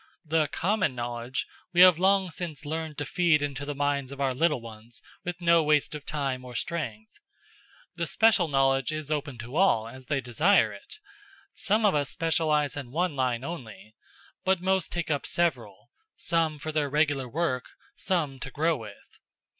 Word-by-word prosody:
The 155 0 +2
common 185 -1 0
knowledge 120 +1 -3 0.3
we 175 - +5
have 180 -3 +8
long 190 -1 +3
since 160 -4 -6
learned 160 0 -4
to 145 - -2
feed 165 -1 +2
into 145 0 -3
the 145 0 -4
minds 140 -1 -1
of 140 - -9
our 135 -2 +1
little 150 +1 +2
ones 115 0 -9 0.2
with 175 0 -4
no 170 -1 +5
waste 150 -1 +2
of 150 -1 -8
time 135 -4 -2
or 125 -1 -10
strength; 110 -9 -4 0.9
the 170 - -1
special 220 -4 +4
knowledge 135 -1 +2
is 155 -1 -4
open 145 -4 -2
to 120 +4 -8
all, 135 - +3
as 130 +2 -9
they 140 -2 0
desire 125 - +3
it. 100 - -10 0.6
Some 215 +2 +1
of 205 - +4
us 145 -2 0
specialize 155 -3 +1
in 140 -4 -6
one 165 +3 -1
line 130 -2 0
only. 110 - -8 0.5
But 190 -1 +2
most 190 0 +1
take 170 -2 -2
up 145 - -1
several 120 - -1 0.3
some 165 -2 +1
for 155 +2 -5
their 150 -2 0
regular 145 -3 +1
work, 135 -3 -1 0.3
some 155 -8 -1
to 135 - -6
grow 160 +4 +1
with." 105 -4 -12
145 Hz, 175 wpm, -27 LUFS, 130-170 Hz, 0.9 s, have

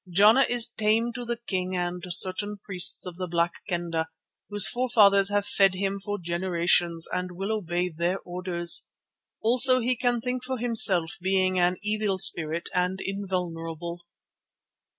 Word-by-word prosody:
Jana 215 +9 +4
is 240 -1 +3
tame 220 +2 -1
to 245 +1 -7
the 235 0 -4
king 185 -5 -4
and 175 0 -4
certain 190 +4 +2
priests 180 -2 0
of 180 -2 -8
the 185 -1 -5
Black 170 0 -2
Kendah, 170 -2 -3 0.4
whose 205 -1 +6
forefathers 210 -6 +3
have 205 0 -1
fed 195 -2 +1
him 195 +1 -3
for 205 +1 -5
generations, 170 -1 -1
and 180 0 -4
will 195 +4 -5
obey 175 -3 -3
their 170 +3 -3
orders. 175 -1 +1 0.6
Also 255 +3 +5
he 250 +1 -1
can 245 0 -1
think 250 +1 -5
for 260 0 -5
himself, 195 -7 +4
being 185 0 0
an 180 +1 +1
evil 210 -2 -2
spirit 170 -3 +2
and 180 +1 -2
invulnerable." 175 -4 -6
190 Hz, 150 wpm, -25 LUFS, 175-215 Hz, 0.6 s, whose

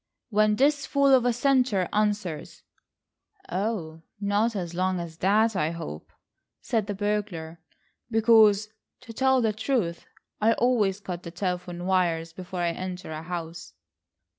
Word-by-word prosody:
"When 210 0 +3
this 280 +3 +2
fool 280 -1 +3
of 255 -2 +5
a 245 - +4
Central 250 -9 +3
answers." 205 -6 -2 0.9
"Oh, 180 -5 -3 0.2
not 205 +3 +1
as 175 -3 -4
long 185 +1 0
as 165 -2 -7
that, 210 +5 +2
I 150 -3 +1
hope," 120 - -7 0.5
said 225 -4 -1
the 205 - -3
burglar, 195 -6 -3 0.5
"because, 220 -2 +5 0.3
to 230 -3 -10
tell 265 +2 +3
the 220 -2 +1
truth, 215 -7 -2 0.3
I 225 +2 +4
always 215 -6 +1
cut 180 -3 -5
the 170 - -8
telephone 180 0 -4
wires 170 -3 +1
before 180 0 -6
I 170 -1 +1
enter 180 -1 -6
a 155 0 -5
house." 170 0 -6
195 Hz, 140 wpm, -26 LUFS, 175-220 Hz, 0.9 s, of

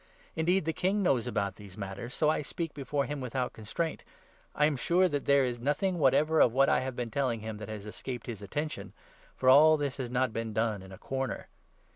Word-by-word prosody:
Indeed, 175 +2 +2
the 160 - 0
King 195 +5 0
knows 130 -10 +2
about 100 -2 -2
these 100 -3 -12
matters, 100 +5 -6
so 155 - +2
I 155 - +2
speak 165 +2 -4
26 - - -39
before 140 0 -1
him 145 -1 -4
without 125 0 -2
constraint. 150 +10 -4 0.5
I 150 - +4
am 150 -1 +2
sure 175 +7 +3
that 145 -5 -2
there 140 -1 +4
is 120 -1 -3
nothing 170 +8 0
whatever 150 +3 +4
of 115 - +5
what 135 +2 +4
I - - +4
have 130 -1 -4
been 120 -2 -4
telling 125 -3 0
him 110 0 -5
that 105 0 -8
has 105 -2 -6
escaped 120 +3 -6
his 115 -4 -6
attention; 150 +10 -4 0.4
for 130 - -2
all 155 +4 +8
this 145 -2 -2
has 130 -3 -4
not 125 -1 0
been 115 -1 -3
done 110 -2 0
in 95 0 -12
a 95 - -9
corner. 135 +4 -4
130 Hz, 225 wpm, -30 LUFS, 115-150 Hz, 0.5 s, all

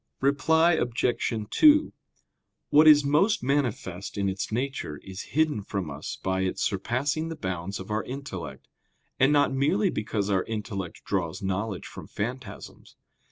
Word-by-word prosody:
Reply 160 +5 +3
Obj. 120 -4 0 0.2
2: 300 0 +5 0.8
What 155 +2 +7
is 145 -2 +8
most 175 - +2
manifest 120 -10 -2
in 100 -1 +1
its 95 +1 -4
nature 120 - -3
is 95 0 -7 0.2
hidden 155 -8 +2
from 95 -5 -4
us 70 +2 -6
by 95 0 0
its 95 -1 -1
surpassing 135 +11 -1
the 165 - -5
bounds 95 - -4
of 95 +2 -8
our 110 +1 0
intellect; 95 - -7 0.5
and 130 +2 +5
not 145 -2 +3
merely 175 +9 +2
because 105 -1 -2
our 95 -1 +2
intellect 100 -5 -5
draws 90 0 -2
knowledge 95 +1 -2
from - - -10
phantasms. 115 -1 -7
115 Hz, 145 wpm, -27 LUFS, 95-145 Hz, 0.8 s, is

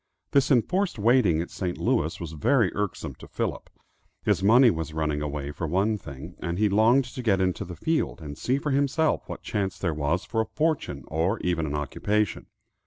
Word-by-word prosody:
This 140 -2 +3
enforced 180 - +2
waiting 105 -6 +4
at - - -11
St. 90 -2 -3
Louis 80 +4 0
was 85 -3 -6
very 100 - +2
irksome 105 -1 -3
to - - -11
Philip. - - -3 0.5
His 100 -4 +2
money 120 +5 +6
was 80 -2 -4
running 75 -2 -1
away, 75 -1 -3
for 80 +2 -4
one 95 +7 +1
thing, 80 -2 -9
and 85 0 -3
he 105 +1 +3
longed 115 +6 +4
to 130 0 -7
get 105 -5 +2
into 95 -1 0
the 90 0 -8
field, 160 - -1
and 75 -3 -7
see 125 - 0
for 145 +1 -2
himself 140 +3 +1
what - - -7
chance 100 -4 -2
there 85 -4 -1
was 75 +6 -1
for 110 +1 0
a 110 - -3
fortune 150 - -1
or 85 +8 0
even 85 -3 0
an 70 - -3
occupation. 100 +6 -1
95 Hz, 195 wpm, -26 LUFS, 80-120 Hz, 0.5 s, money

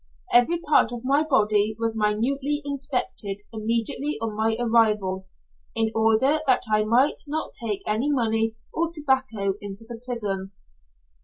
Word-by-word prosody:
Every 245 +8 +5
part 295 -7 +3
of 240 0 -7
my 280 +3 +3
body 215 -7 +2
was 225 0 -1
minutely 265 +8 0
inspected 265 -8 -1
immediately 230 +6 -1
on 225 -1 -3
my 220 +1 +1
arrival, 210 -5 +2 0.5
in 225 -1 +1
order 225 +7 +3
that 255 - +3
I 215 0 +4
might 240 +6 +3
not 310 +2 -3
take 210 -3 -3
any 220 +7 0
money 225 -4 +1 0.2
or 335 0 0
tobacco 260 - 0
into 205 +2 -8
the 235 -1 -8
prison. 200 -6 -4
225 Hz, 140 wpm, -24 LUFS, 215-270 Hz, 0.5 s, Every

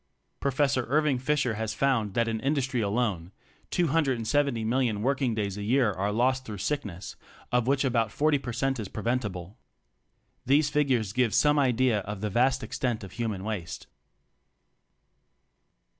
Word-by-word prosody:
Professor 135 -2 +1
Irving 145 0 +2
Fisher 130 -2 0
has 110 0 -3
found 115 -8 +1
that 115 0 +2
in 110 -1 -1
industry 135 -1 0
alone, 100 -5 -1 0.4
270,000,000 130 -6 +1
working 130 -3 +1
days 100 -2 -2
a - - -4
year 120 +2 +2
are 100 +2 -2
lost 130 +4 +1
through 110 -5 -7
sickness, 100 - -4 0.4
of 125 -1 +1
which 140 +1 +2
about 115 -4 +1
40 150 +2 +2
per 125 - -5
cent 135 +2 -1
is 105 - -4
preventible. 105 -5 -3 0.8
These 145 +3 +3
figures 130 -9 +1
give 125 -2 +1
some 150 0 +4
idea 125 -4 +2
of 100 0 -6
the 105 -1 -2
vast 125 +5 +2
extent 120 -6 -2
of 95 - -9
human 110 -5 -3
waste. 100 -6 -5
120 Hz, 145 wpm, -27 LUFS, 105-135 Hz, 0.8 s, some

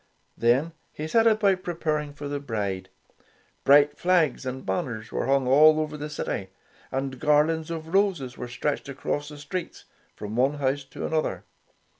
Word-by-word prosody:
Then 125 +8 +2 0.2
he 155 - -5
set 225 +7 +4
about 205 -4 +3
preparing 155 -4 -2
for 145 0 -7
the 145 0 -3
bridal. 105 -8 -3 0.7
Bright 145 +1 +5
flags 165 -7 +2
and 130 +1 -5
banners 120 -11 -3
were - - -2
hung 135 -1 +2
all 155 +4 +6
over 155 -1 -2
the 150 0 -5
city, 95 -9 -4 0.4
and 135 -1 -3
garlands 155 +2 +2
of 165 0 -6
roses 180 -11 +1
were 125 - -6
stretched 140 +4 -3
across 145 +2 -3
the 150 - -10
streets, 165 +5 -6 0.3
from 105 +1 -6
one 135 +4 +2
ouseh 140 -1 -1
to - - -6
another. 155 -1 -1
145 Hz, 160 wpm, -26 LUFS, 130-160 Hz, 0.7 s, all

